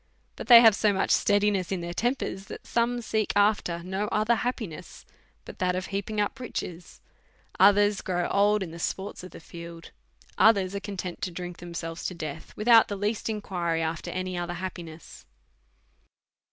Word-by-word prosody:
But - - -8
they 235 -2 +10
have 225 -2 +7
so 210 +1 +2
much 195 - 0
steadiness 205 -3 +2
in 190 -2 -2
their 170 0 -5
tempers, 235 -3 -2
that - - -10
some 240 +1 0
seek 220 -1 -1
after 205 -5 +2
no 190 +3 -2
other 215 +3 +2
happiness 220 -8 -4 0.4
but - - -11
that 180 -1 +1
of 185 +1 -3
heaping 200 +2 -3
up 205 +5 -1
riches; 180 -8 -7 0.6
others 205 +1 +5
grow 175 -1 -1
old 205 0 +3
in 170 - -7
the 170 - -9
sports 190 +3 -4
of 185 - -8
the - - -12
field; 170 +1 -10 0.5
others 200 -4 +4
are 200 - -2
content 190 -3 -6
to - - -2
drink 175 0 -7
themselves 170 -1 -6
to 180 - -6
death_, 155 -2 -7
with 215 - -5
out 230 -2 +7
the 205 - -4
least 210 +3 -2
inquiry 175 -6 -2
after 160 0 -3
any 185 0 -3
other 175 0 -3
happiness. 170 -3 -8
190 Hz, 175 wpm, -27 LUFS, 175-210 Hz, 0.6 s, they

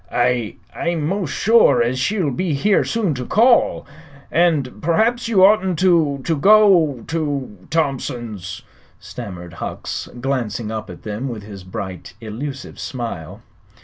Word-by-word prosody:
"I 120 -2 0 0.2
I'm 170 -3 -1
'most 185 -1 -1
sure 220 - +4
as 125 +2 -1
she'll 170 +2 0
be 160 +3 -1
here 200 +8 +3
soon 215 -8 0
to 125 -2 -4
call, 235 - +3
sir. - - -22 0.4
And 155 -7 +1
perhaps 225 +9 +1
you 195 -5 +5
oughtn't 190 -4 +3
to 165 -6 +2
to 165 - 0
go 175 - +5
to 145 -9 -3
Thompson's," 120 - -3 0.4
stammered 90 -3 -8
Hucks, - - -5
glancing 120 -4 -2
up 110 -1 -5
at - - -11
them 110 +5 -4
with 110 -4 -6
his 100 -2 -10
bright, 90 -1 -7
elusive 130 +5 -7
smile. 110 - -6
140 Hz, 140 wpm, -20 LUFS, 115-175 Hz, 0.4 s, you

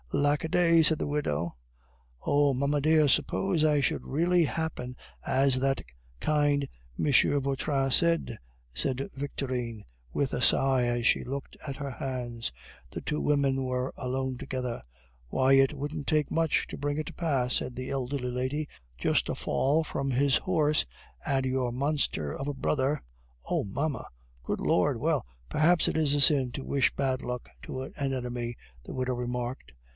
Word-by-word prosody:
"Lack 145 +3 +2
a 160 - -2
day!" 165 -1 +5
said 160 0 +3
the - - -1
widow. 85 - -1 0.7
"Oh! 145 -1 +3
mamma 140 +3 +1
dear, 155 0 +4
suppose 175 +4 +2
it 150 -2 +3
should - - 0
really 170 +4 +2
happen 145 -5 -3 0.3
as 135 0 +3
that 135 +1 +1 0.4
kind 145 -2 +2 0.3
M. 145 - +2 0.3
Vautrin 135 0 0
said!" 165 -6 +2 0.4
said 135 - -1
Victorine 125 -5 -4 0.3
with 140 -2 -1
a 125 - -1
sigh 130 -1 +4
as 120 -1 +1
she - - +3
looked 140 +2 -6
at 140 -2 -5
her 140 -2 -4
hands. 120 -3 -4 0.4
The - - -5
two 150 - -2
women 140 -2 +2
were 125 0 -2
alone 130 0 -2
together. 125 -2 -4 0.5
"Why, 130 - +3
it 135 0 +6
wouldn't 145 0 -5
take 150 -2 +1
much 165 -2 +1
to - - -6
bring 145 +1 -2
it 155 - -2
to - - -7
pass," 135 -7 0
said 125 - -1
the 130 +1 -5
elderly 130 -1 -2
lady; 130 +5 -2 0.3
"just - - +1
a - - -1
fall 150 +5 +1
from 135 -3 -3
his 135 +1 +3
horse, 155 -4 +2 0.4
and 135 -1 +1
your 130 -2 0
monster 130 - -1
of 135 - -4
a - - -2
brother 135 +1 0 0.2
" - - -33
"Oh! - - +2
mamma." 140 +8 -2 0.4
"Good - - -2
Lord! - - +2
Well, - - +1 0.2
perhaps 165 - +3
it - - 0
is 155 -3 +3
a - - +2
sin 135 -4 +5
to 135 - -5
wish 140 -2 +2
bad 130 -1 0
luck 125 -1 -4
to 130 - -5
an - - -9 0.2
enemy," 120 -2 -3 0.3
the - - -8
widow 130 0 -1
remarked. 125 - -4
135 Hz, 170 wpm, -29 LUFS, 125-150 Hz, 0.7 s, it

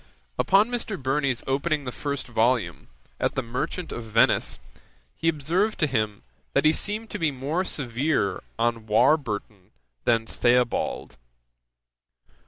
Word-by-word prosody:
Upon 205 +5 +4
Mr. 225 -6 -3
Burney's 135 -1 0
opening 145 +3 0
the 125 - -4
first 140 +1 -3
volume, 115 -6 0 0.3
at - - 0
the 135 - 0
Merchant 140 +9 -4
of - - -4
Venice, 115 0 +2 0.6
he 165 - -3
observed 170 +8 0
to - - +3
him, 110 -7 -1 0.3
that - - +2
he 155 - +6
seemed 215 +4 -2
to 210 - -4
be 165 -2 +2
more 145 +6 -2
severe 130 - 0 0.2
on 115 -1 0
Warburton 110 - +1 0.4
than 115 -1 +3
Theobald. 120 +1 0
135 Hz, 130 wpm, -25 LUFS, 115-160 Hz, 0.6 s, he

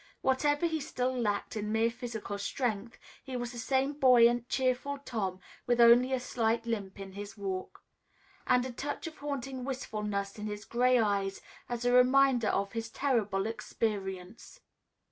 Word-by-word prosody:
Whatever 290 +4 +2
he 320 -1 0
still 255 -2 -2
lacked 210 -4 -1
in 210 0 -3
mere 225 +1 +2
physical 230 -4 -5
strength, 225 +1 -2 0.3
he 260 -2 -5
was 240 -1 -4
the 240 - -7
same 265 +4 +1
buoyant, 245 -3 +5
cheerful 260 +2 0
Tom, 205 -9 -3 0.3
with 240 0 +2
only 240 +2 +7
a 260 - +1
slight 230 -2 0
limp 205 -5 -4
in 195 -1 -7
his 205 +2 -8
walk, 190 -2 -5 0.6
and 250 0 +3
a 260 - -4
touch 285 +7 -5
of 320 -1 -7
haunting 270 -3 -4
wistfulness 210 -6 -3
in 210 - -4
his 210 0 -6
gray 250 +1 +3
eyes 200 -3 0 0.3
as 240 0 -3
a 245 - +3
reminder 250 -1 +5
of 200 0 0
his 225 0 -4
terrible 215 -8 0
experience. 210 - -4
235 Hz, 160 wpm, -31 LUFS, 210-255 Hz, 0.6 s, only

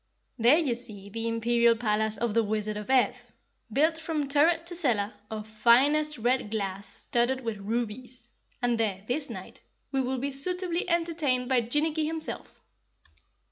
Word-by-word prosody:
"There 240 +7 +6
you 300 -8 +1
see 215 -4 -6
the 225 +2 -3
imperial 235 +1 +3
palace 220 -1 +2
of 230 0 -1
the 230 - +4
Wizard 215 0 -2
of 210 +2 -6
Ev, 260 -2 +2 0.5
built 315 +7 +2
from 315 -3 -2
turret 320 +4 +3
to 350 +1 -6
cellar 230 -11 +1 0.2
of 215 -1 -6
finest 265 +8 +3
red 245 -1 0
glass 200 -2 -3
studded 240 +5 -1
with 225 -3 -3
rubies, 235 +4 -4 0.4
and 240 -1 +1
there, 200 -4 -1
this 285 +4 -2
night, - - -9 0.3
we 270 -1 +1
will 260 +1 -1
be 280 +3 -2
suitably 360 +5 -1
entertained 320 -7 0
by 255 -2 +3
Jinnicky 300 +6 0
himself." 320 0 -5
245 Hz, 155 wpm, -28 LUFS, 220-300 Hz, 0.5 s, There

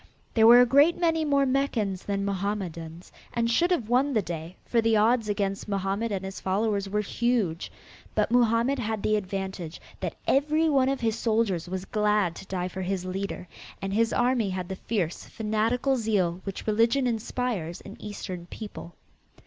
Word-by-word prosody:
There 220 -1 +6
were 240 +1 +9
a - - +6
great 285 +7 +5
many 325 -2 +2
more 280 -2 +3
Meccans 240 -8 0
than 200 -1 -1
Mohammedans, 185 -4 -4 0.2
and 235 0 +1
should 345 +9 +3
have 330 -12 0
won 260 +4 +2
the 215 -4 +2
day, 165 +1 -6
for 235 - +2
the 225 -1 +3
odds 225 +1 +3
against 195 -1 -1
Mohammed 200 +3 -1
and 190 -1 -2
his 190 0 -6
followers 200 +1 0
were 210 +1 0
huge, 210 -6 -1 0.4
but - - +1
Mohammed 240 +2 +3
had 220 -3 -2
the 215 - +2
advantage 190 -4 -4 0.2
that - - -3
every 305 +4 +2
one 270 -3 +3
of 270 -1 -1
his 225 0 0
soldiers 215 -7 0
was 185 0 -4
glad 210 -5 +1
to 195 - -10
die 180 -2 -2
for 190 +1 -6
his 185 0 -2
leader 185 0 -4 0.3
and 195 0 -3
his 225 +2 +2
army 245 -4 +2
had 185 -1 -4
the 190 - -3
fierce, 185 -5 -2
fanatical 225 +5 0
zeal 195 -7 0
which 195 -1 -5
religion 230 +5 +2
inspires 225 -6 -2
in - - -10
eastern 185 -4 -6
people. 190 -4 -9
210 Hz, 175 wpm, -27 LUFS, 190-240 Hz, 0.4 s, were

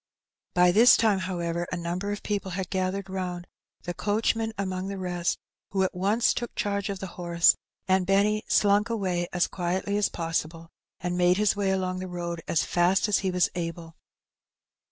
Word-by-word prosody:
By 180 0 +5
this 235 +6 +7
time, 215 -4 +3
however, 175 -2 -2
a 180 - -2
number 175 +4 -3
of 205 - -5
people 200 -2 -2
had 190 -2 -4
gathered 190 +1 -1
round, 180 -2 -4 0.4
the 175 - -4
coachman 220 +4 0
amongst 190 -1 -3
the 200 - -4
rest, 180 -2 -1 0.4
who 190 -1 +2
at 190 - -1
once 205 +6 +2
took 240 -1 -5
charge 200 -1 -1
of 200 - -3
the 190 - -6 0.2
horse, 170 -1 +4 0.3
and 185 -1 +2
Benny 205 +2 +2
slunk 205 +2 +3
away 185 -6 -1
as 180 -1 +2
quietly 190 +3 -2
as 205 - +2
possible, 165 0 -3 0.3
and 180 0 -2
made 180 +1 +4
his 210 0 +2
way 200 -1 0
aloug 185 -1 -1
the 185 - -5
road 170 -1 -4
as 165 - +2
fast 180 +4 +2
as 210 - +2
he 190 - -1
was 180 -1 +2
able. 165 -1 -5
185 Hz, 180 wpm, -27 LUFS, 175-200 Hz, 0.4 s, this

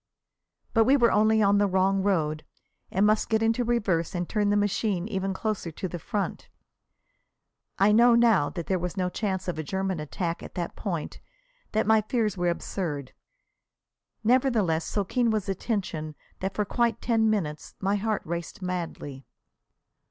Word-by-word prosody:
But 225 -1 +4
we 275 +4 +5
were 240 -3 +4
only 215 +1 +4
on 200 0 +4
the 205 - +3
wrong 190 +1 +2
road, 155 -6 0 0.5
and 195 +2 +2
must 215 +1 +2
get 220 0 +2
into 225 +2 +2
reverse 200 -9 0
and 175 -1 -2
turn 210 -2 +1
the 205 - +3
machine 205 -2 0
even 195 -3 -2
closer 200 -2 -2
to 185 - -4
the 175 0 -6
front. 200 +5 -3 1.3
I 200 +2 +4
know 235 +2 +6
now 225 -11 +4
that 170 -3 -5
there 190 -1 0
was 180 +2 -4
no 180 -1 0
chance 190 -3 -2
of 175 -3 -2
a - - -2
German 190 +1 -2
attack 165 +3 -3
at - - -10
that 175 -1 -4
point, 170 -7 -4 0.5
that 220 +1 +2
my 220 +1 +5
fears 215 -2 -1
were 175 -1 0
absurd. 155 -6 -4 1.1
Nevertheless, 220 -9 +2
so 205 - -1
keen 240 +4 +1
was 215 -3 0
the 195 - -1
tension 170 -7 -3 0.2
that 190 +1 -3
for 210 - 0
quite 235 +1 0
ten 225 -2 +2
minutes 160 -8 -2
my 200 +1 +1
heart 215 0 -1
raced 170 +3 -5
madly. 170 -7 -5
195 Hz, 170 wpm, -27 LUFS, 175-220 Hz, 1.3 s, know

